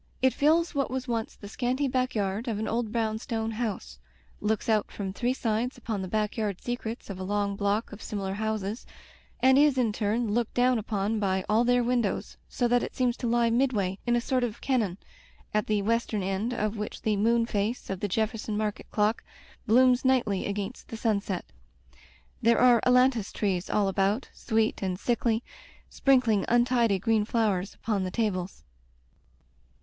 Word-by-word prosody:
It 260 Hz, 0 st, +3 dB
fills 330 Hz, +4 st, +2 dB
what 280 Hz, -2 st, 0 dB
was 255 Hz, +1 st, -3 dB
once 230 Hz, -2 st, -2 dB
the 205 Hz, -, -10 dB
scanty 255 Hz, +6 st, -1 dB
backyard 235 Hz, -4 st, -1 dB
of 225 Hz, -3 st, -1 dB
an 220 Hz, -, -2 dB
old 230 Hz, -1 st, -1 dB
brownstone 225 Hz, 0 st, -2 dB
house, 215 Hz, -, -4 dB, 0.4 s
looks 215 Hz, 0 st, -1 dB
out 215 Hz, -2 st, +2 dB
from 195 Hz, -2 st, -5 dB
three 245 Hz, +4 st, 0 dB
sides 235 Hz, +2 st, -1 dB
upon 220 Hz, -4 st, -4 dB
the 190 Hz, -, -4 dB
backyard 210 Hz, -1 st, -1 dB
secrets 240 Hz, -3 st, -5 dB
of 190 Hz, -, -7 dB
a -, -, -4 dB
long 200 Hz, +1 st, -1 dB
block 205 Hz, +2 st, -1 dB
of 210 Hz, -, -10 dB
similar 195 Hz, -2 st, -3 dB
houses, 215 Hz, +1 st, -3 dB, 0.5 s
and 265 Hz, +1 st, +6 dB
is 290 Hz, -2 st, +4 dB
in 235 Hz, -4 st, +2 dB
turn 215 Hz, +1 st, 0 dB
looked 235 Hz, 0 st, -1 dB
down 250 Hz, -1 st, +3 dB
upon 210 Hz, 0 st, -1 dB
by 190 Hz, -2 st, 0 dB
all 220 Hz, +2 st, +3 dB
their 245 Hz, 0 st, +3 dB
windows, 240 Hz, -3 st, -1 dB
so 245 Hz, -, 0 dB
that 245 Hz, 0 st, +3 dB
it -, -, -5 dB
seems 250 Hz, -2 st, +1 dB
to 245 Hz, -, -3 dB
lie 235 Hz, 0 st, +2 dB
midway 220 Hz, -7 st, +1 dB
in 240 Hz, -, +3 dB
a 240 Hz, -, +2 dB
sort 255 Hz, 0 st, 0 dB
of 235 Hz, -2 st, -3 dB
caiion, 220 Hz, -9 st, 0 dB, 0.6 s
at 210 Hz, 0 st, +1 dB
the 210 Hz, -2 st, +1 dB
western 225 Hz, -2 st, 0 dB
end 195 Hz, +5 st, -1 dB
of 215 Hz, -2 st, -2 dB
which 210 Hz, 0 st, -5 dB
the 215 Hz, -1 st, +2 dB
moon 230 Hz, +3 st, +2 dB
face 215 Hz, +1 st, -2 dB
of 190 Hz, -, -3 dB
the 205 Hz, -, -1 dB
Jefferson 215 Hz, +1 st, -1 dB
Market 210 Hz, -1 st, -3 dB
clock 210 Hz, +2 st, +1 dB, 0.4 s
blooms 250 Hz, +2 st, +5 dB
nighdy 240 Hz, -7 st, +1 dB
against 200 Hz, +4 st, -5 dB
the 225 Hz, -, -7 dB
sunset. 200 Hz, -5 st, -1 dB, 1.0 s
There 235 Hz, 0 st, +4 dB
are 245 Hz, -2 st, +5 dB
ailantus 250 Hz, -4 st, +3 dB
trees 185 Hz, -4 st, -1 dB
all 205 Hz, -2 st, +2 dB
about, 195 Hz, +5 st, 0 dB
sweet 220 Hz, -2 st, 0 dB
and 185 Hz, -2 st, -2 dB
sickly, 235 Hz, -1 st, 0 dB, 0.5 s
sprinkling 250 Hz, -7 st, +3 dB
un 240 Hz, 0 st, +4 dB
tidy 235 Hz, -5 st, +2 dB
green 215 Hz, +2 st, +1 dB
flowers 210 Hz, -4 st, 0 dB
upon 205 Hz, -3 st, -1 dB
the 185 Hz, -, -2 dB
tables. 185 Hz, -, -2 dB
220 Hz, 175 wpm, -28 LUFS, 205-245 Hz, 1.0 s, and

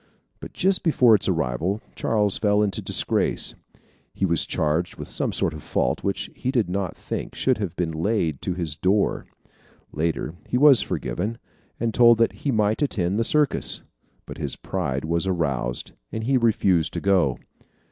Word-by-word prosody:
But -, -, -10 dB
just 190 Hz, 0 st, +1 dB
before 125 Hz, -8 st, +4 dB
its 100 Hz, -2 st, +2 dB
arrival, 85 Hz, -, -1 dB, 0.2 s
Charles 105 Hz, -3 st, +1 dB
fell 105 Hz, 0 st, +3 dB
into 100 Hz, -2 st, -2 dB
disgrace. -, -, +1 dB, 0.6 s
He 100 Hz, -, 0 dB
was 85 Hz, -4 st, +2 dB
charged 80 Hz, +3 st, -1 dB
with -, -, -8 dB
some -, -, 0 dB
fault 60 Hz, -, -1 dB
which 100 Hz, -1 st, -2 dB
he 130 Hz, -, -3 dB
did 120 Hz, -9 st, 0 dB
not 95 Hz, -1 st, -3 dB
think -, -, -5 dB
should 130 Hz, -4 st, +1 dB
have 95 Hz, -5 st, -3 dB
been 85 Hz, -3 st, -1 dB
laid 80 Hz, -3 st, -1 dB
to 90 Hz, -, -2 dB
his 85 Hz, -5 st, -3 dB
door. 100 Hz, +6 st, 0 dB, 0.6 s
Later 80 Hz, 0 st, -2 dB, 0.2 s
he 125 Hz, -, +1 dB
was 140 Hz, -4 st, +7 dB
forgiven, 95 Hz, -, -3 dB, 0.4 s
and 115 Hz, -1 st, -1 dB
told 120 Hz, -1 st, +6 dB
that 115 Hz, 0 st, +2 dB
he 140 Hz, -, -2 dB
might 110 Hz, 0 st, +1 dB
attend 100 Hz, -8 st, 0 dB
the -, -, +2 dB
circus. 150 Hz, +3 st, 0 dB, 0.4 s
But -, -, -9 dB
his -, -, -3 dB
pride 70 Hz, +2 st, -3 dB
was 85 Hz, +3 st, -1 dB
aroused, 70 Hz, -9 st, -2 dB, 0.2 s
and 110 Hz, -, -4 dB
he 135 Hz, +4 st, +1 dB
refused 100 Hz, -9 st, +2 dB
to -, -, -2 dB
go. 90 Hz, -10 st, +2 dB
100 Hz, 165 wpm, -24 LUFS, 85-115 Hz, 0.6 s, was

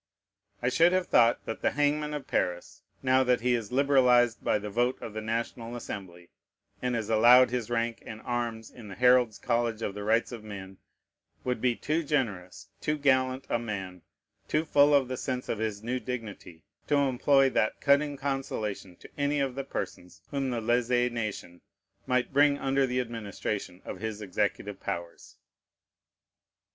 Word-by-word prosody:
I 125 Hz, -, +3 dB
should 170 Hz, +7 st, +4 dB
have 185 Hz, -1 st, +2 dB
thought 115 Hz, -6 st, +3 dB
that 115 Hz, -, -5 dB
the -, -, +3 dB
hangman 150 Hz, +1 st, 0 dB
of 145 Hz, -, -6 dB
Paris, 90 Hz, -1 st, -2 dB, 0.2 s
now 130 Hz, 0 st, +4 dB
that 125 Hz, -1 st, +2 dB
he 125 Hz, +1 st, +2 dB
is 115 Hz, -3 st, -2 dB
liberalized 125 Hz, -3 st, +4 dB
by -, -, +2 dB
the 105 Hz, 0 st, -6 dB
vote 120 Hz, +4 st, 0 dB
of 110 Hz, -, -7 dB
the 110 Hz, -, -4 dB
National 115 Hz, +1 st, -3 dB
Assembly, 90 Hz, -7 st, -8 dB, 0.5 s
and 125 Hz, -1 st, -1 dB
is 110 Hz, -3 st, -2 dB
allowed 120 Hz, +3 st, +6 dB
his 120 Hz, -3 st, -2 dB
rank 115 Hz, -1 st, -1 dB
and 110 Hz, -, -8 dB
arms 120 Hz, -2 st, -3 dB
in 115 Hz, -4 st, -12 dB
the 95 Hz, -, -8 dB
Herald's 125 Hz, -3 st, +4 dB
College 115 Hz, +1 st, -1 dB
of 100 Hz, -, -2 dB
the 105 Hz, 0 st, -6 dB
rights 115 Hz, +4 st, +1 dB
of 115 Hz, -3 st, -8 dB
men, 95 Hz, -3 st, -9 dB, 0.6 s
would 125 Hz, -3 st, -2 dB
be 125 Hz, -2 st, +2 dB
too 155 Hz, +6 st, -1 dB
generous, 100 Hz, -, -2 dB
too 150 Hz, 0 st, -1 dB
gallant 130 Hz, -2 st, +1 dB
a 120 Hz, -, 0 dB
man, 95 Hz, -6 st, -5 dB, 0.5 s
too 155 Hz, +1 st, 0 dB
full 145 Hz, -1 st, +5 dB
of 135 Hz, -3 st, +3 dB
the 130 Hz, 0 st, -4 dB
sense 125 Hz, 0 st, -3 dB
of 110 Hz, -, -2 dB
his 110 Hz, -2 st, -3 dB
new 125 Hz, +2 st, -2 dB
dignity, 110 Hz, -10 st, -7 dB, 0.2 s
to 145 Hz, -, +2 dB
employ 135 Hz, 0 st, +3 dB
that 110 Hz, -, 0 dB
cutting 145 Hz, 0 st, +2 dB
consolation 120 Hz, -9 st, -3 dB
to -, -, -15 dB
any 145 Hz, +1 st, +1 dB
of 135 Hz, -2 st, 0 dB
the 135 Hz, +2 st, -4 dB
persons 95 Hz, -8 st, -6 dB
whom 140 Hz, -2 st, -1 dB
the 120 Hz, -2 st, -2 dB
lèze 120 Hz, +1 st, +1 dB
nation 105 Hz, -6 st, -5 dB, 0.5 s
might 125 Hz, +1 st, 0 dB
bring 145 Hz, 0 st, +4 dB
under 135 Hz, 0 st, +1 dB
the 125 Hz, 0 st, -1 dB
administration 105 Hz, -5 st, -4 dB
of -, -, -6 dB
his 110 Hz, -1 st, -4 dB
executive 100 Hz, -4 st, -2 dB
powers. 85 Hz, -1 st, -6 dB
120 Hz, 175 wpm, -28 LUFS, 110-135 Hz, 0.6 s, allowed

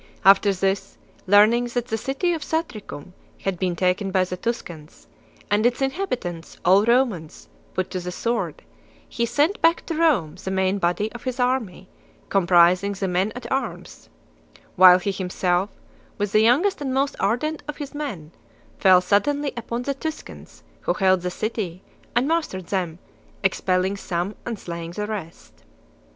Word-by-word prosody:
After 200 Hz, +1 st, +6 dB
this, 195 Hz, +1 st, -1 dB, 0.3 s
learning 215 Hz, +5 st, +5 dB
that 245 Hz, 0 st, -1 dB
the 225 Hz, -, 0 dB
city 275 Hz, -, -1 dB
of 325 Hz, -, -4 dB
Satricum 220 Hz, -, -4 dB, 0.3 s
had 190 Hz, -3 st, -2 dB
been 180 Hz, -2 st, 0 dB
taken 185 Hz, +3 st, 0 dB
by 185 Hz, -1 st, +2 dB
the 180 Hz, 0 st, -4 dB
Tuscans, 175 Hz, -8 st, -6 dB, 0.5 s
and 205 Hz, +1 st, +3 dB
its 245 Hz, +1 st, +2 dB
inhabitants, 265 Hz, -, -3 dB
all 190 Hz, +3 st, +6 dB
Romans, 235 Hz, -10 st, 0 dB, 0.3 s
put 185 Hz, 0 st, -2 dB
to 185 Hz, -, -2 dB
the 180 Hz, 0 st, -5 dB
sword, 230 Hz, +5 st, -2 dB, 0.4 s
he 235 Hz, 0 st, -2 dB
sent 300 Hz, -, +1 dB
back 330 Hz, 0 st, +3 dB
to 330 Hz, -, -3 dB
Rome 270 Hz, -, +2 dB
the -, -, -3 dB
main 190 Hz, +1 st, +1 dB
body 180 Hz, +5 st, 0 dB
of 240 Hz, -, -9 dB
his 255 Hz, 0 st, -3 dB
army, 245 Hz, -8 st, -1 dB, 0.4 s
comprising 180 Hz, +1 st, +4 dB
the 195 Hz, 0 st, -3 dB
men 185 Hz, +3 st, 0 dB
at 245 Hz, -1 st, -8 dB
arms, 270 Hz, +1 st, -4 dB, 0.7 s
while 180 Hz, -1 st, +9 dB
he 190 Hz, +2 st, -2 dB
himself, 185 Hz, 0 st, -1 dB, 0.5 s
with 205 Hz, -1 st, -2 dB
the 215 Hz, -, +4 dB
youngest 290 Hz, -, +3 dB
and 270 Hz, -2 st, -2 dB
most 275 Hz, +1 st, +1 dB
ardent 250 Hz, +10 st, 0 dB
of 300 Hz, -, -5 dB
his 290 Hz, -1 st, -7 dB
men, 210 Hz, -, -5 dB, 0.5 s
fell 185 Hz, -1 st, +6 dB
suddenly 280 Hz, +10 st, +1 dB
upon 235 Hz, +1 st, -4 dB
the 280 Hz, -, -1 dB
Tuscans 310 Hz, +3 st, -8 dB, 0.2 s
who -, -, -1 dB
held 190 Hz, -2 st, +3 dB
the 180 Hz, -, -2 dB
city 190 Hz, -2 st, -4 dB, 0.3 s
and 245 Hz, +3 st, +2 dB
mastered 305 Hz, -, -1 dB
them, 175 Hz, -3 st, -2 dB, 0.5 s
ex 190 Hz, -, +1 dB
pelling 185 Hz, +1 st, +1 dB
some 180 Hz, +3 st, -2 dB
and 235 Hz, -2 st, -3 dB
slaying 170 Hz, -2 st, -6 dB
the 210 Hz, +3 st, -3 dB
rest. 200 Hz, -6 st, -8 dB
200 Hz, 160 wpm, -23 LUFS, 180-250 Hz, 0.7 s, while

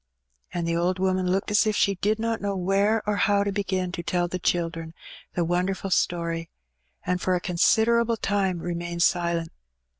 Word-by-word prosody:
And 170 Hz, -1 st, -2 dB
the 170 Hz, -, 0 dB
old 175 Hz, +2 st, +1 dB
woman 185 Hz, -1 st, 0 dB
looked 195 Hz, +2 st, -1 dB
as 210 Hz, +2 st, +4 dB
if 215 Hz, -, +1 dB
she 200 Hz, -, +3 dB
did 210 Hz, +3 st, 0 dB
not 225 Hz, 0 st, -2 dB
know 200 Hz, -1 st, -1 dB
where 200 Hz, +4 st, +1 dB
or 210 Hz, -1 st, +1 dB
how 200 Hz, +1 st, +3 dB
to 200 Hz, -, -1 dB
begin 190 Hz, -2 st, -1 dB
to 175 Hz, -, -4 dB
tell 175 Hz, +1 st, 0 dB
the 185 Hz, +1 st, -4 dB
children 165 Hz, -2 st, -2 dB, 0.4 s
the 175 Hz, -, +1 dB
wonderful 185 Hz, +3 st, -1 dB
story, 170 Hz, -2 st, 0 dB, 0.6 s
and 180 Hz, 0 st, -1 dB
for 185 Hz, -, +1 dB
a -, -, 0 dB
consider 220 Hz, +7 st, +3 dB
able 230 Hz, -1 st, 0 dB
time 195 Hz, -3 st, 0 dB
remained 170 Hz, 0 st, -2 dB
silent. 170 Hz, -2 st, +1 dB
185 Hz, 185 wpm, -25 LUFS, 175-200 Hz, 0.6 s, as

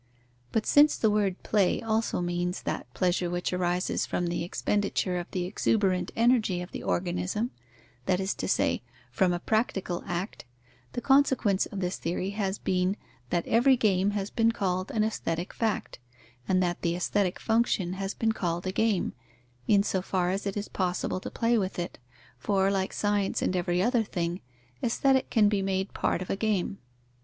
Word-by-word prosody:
But 220 Hz, -, 0 dB
since 295 Hz, +1 st, +5 dB
the 220 Hz, -, +3 dB
word 200 Hz, -3 st, 0 dB
play 200 Hz, -4 st, +2 dB
also 225 Hz, -4 st, 0 dB
means 175 Hz, +1 st, -2 dB
that -, -, -4 dB
pleasure 180 Hz, -1 st, +1 dB
which 175 Hz, +1 st, -2 dB
arises 180 Hz, 0 st, 0 dB
from 175 Hz, -, -1 dB
the 170 Hz, 0 st, -1 dB
expenditure 190 Hz, 0 st, 0 dB
of 175 Hz, -, -7 dB
the 180 Hz, -1 st, -2 dB
exuberant 190 Hz, -1 st, +1 dB
energy 230 Hz, -6 st, +3 dB
of 180 Hz, +1 st, -7 dB
the -, -, -6 dB
organism 180 Hz, +6 st, -1 dB, 0.6 s
(that 185 Hz, -1 st, +2 dB
is 190 Hz, +1 st, 0 dB
to -, -, -4 dB
say, -, -, +1 dB, 0.3 s
from 190 Hz, -3 st, +2 dB
a 175 Hz, -, -1 dB
practical 195 Hz, -4 st, -1 dB
act), 175 Hz, +4 st, -4 dB, 0.5 s
the 245 Hz, -, -3 dB
consequence 265 Hz, -7 st, +3 dB
of 200 Hz, -, -6 dB
this 180 Hz, +1 st, -1 dB
theory 180 Hz, +3 st, -2 dB
has 200 Hz, -1 st, -2 dB
been, 185 Hz, +2 st, 0 dB, 0.3 s
that 175 Hz, -1 st, 0 dB
every 250 Hz, +3 st, +4 dB
game 195 Hz, -3 st, +2 dB
has 200 Hz, 0 st, -3 dB
been 230 Hz, 0 st, +3 dB
called 185 Hz, -4 st, -1 dB
an 215 Hz, -, +1 dB
aesthetic 175 Hz, -5 st, -2 dB
fact, 225 Hz, -2 st, -2 dB, 0.5 s
and 185 Hz, -1 st, +3 dB
that 175 Hz, -1 st, -1 dB
the 170 Hz, -1 st, 0 dB
aesthetic 185 Hz, +1 st, 0 dB
function 220 Hz, -5 st, +1 dB
has 195 Hz, +1 st, -4 dB
been 225 Hz, -1 st, +1 dB
called 175 Hz, -4 st, -2 dB
a 185 Hz, -, 0 dB
game, 215 Hz, -1 st, +1 dB, 0.5 s
in 200 Hz, -1 st, +5 dB
so 190 Hz, -2 st, 0 dB
far 180 Hz, -1 st, 0 dB
as 195 Hz, +2 st, -2 dB
it 200 Hz, -, -3 dB
is 205 Hz, -, -3 dB
possible 185 Hz, 0 st, -1 dB
to -, -, -6 dB
play 230 Hz, 0 st, +2 dB
with 190 Hz, -1 st, -3 dB
it, 175 Hz, -6 st, -4 dB, 0.4 s
for, 195 Hz, +5 st, +2 dB
like 190 Hz, -1 st, 0 dB
science 205 Hz, -1 st, 0 dB
and 185 Hz, -, 0 dB
every 175 Hz, 0 st, +1 dB
other 240 Hz, +1 st, +3 dB
thing, 175 Hz, -3 st, -3 dB, 0.4 s
Aesthetic 265 Hz, +3 st, +2 dB
can 215 Hz, -3 st, +4 dB
be 205 Hz, -1 st, +1 dB
made 190 Hz, 0 st, -1 dB
part 180 Hz, -, 0 dB
of -, -, -5 dB
a -, -, +1 dB
game. 200 Hz, -2 st, -1 dB
190 Hz, 180 wpm, -28 LUFS, 180-215 Hz, 0.6 s, since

